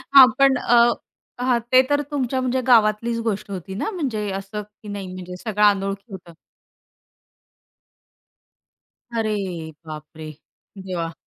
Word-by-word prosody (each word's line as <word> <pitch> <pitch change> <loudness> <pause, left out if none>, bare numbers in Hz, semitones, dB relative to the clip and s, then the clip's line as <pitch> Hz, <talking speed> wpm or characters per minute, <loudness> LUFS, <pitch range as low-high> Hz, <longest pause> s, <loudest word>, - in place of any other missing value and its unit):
हां, 265 -2 +11
पण 275 -1 +5
अ, 240 -1 +3 0.6
हां, 250 -1 +2
ते 255 0 +8
तर 290 0 +2
तुमच्या 260 -2 -1
म्हणजे 255 0 0
गावातलीच 230 0 +3
गोष्ट 205 -1 -2
होती 190 0 -6
ना? 220 - -2
म्हणजे 235 - -2
असं 195 +2 -5
की 210 +1 -18
नाही 200 -2 -5
म्हणजे 180 0 -8
सगळं 210 -1 0
अनोळखी 195 +1 0
होतं? 175 -3 -10 2.8
अरे 215 -1 0 0.5
बापरे! 155 0 -9 0.5
देवा! 180 -3 -4
210 Hz, 120 wpm, -22 LUFS, 190-245 Hz, 2.8 s, हां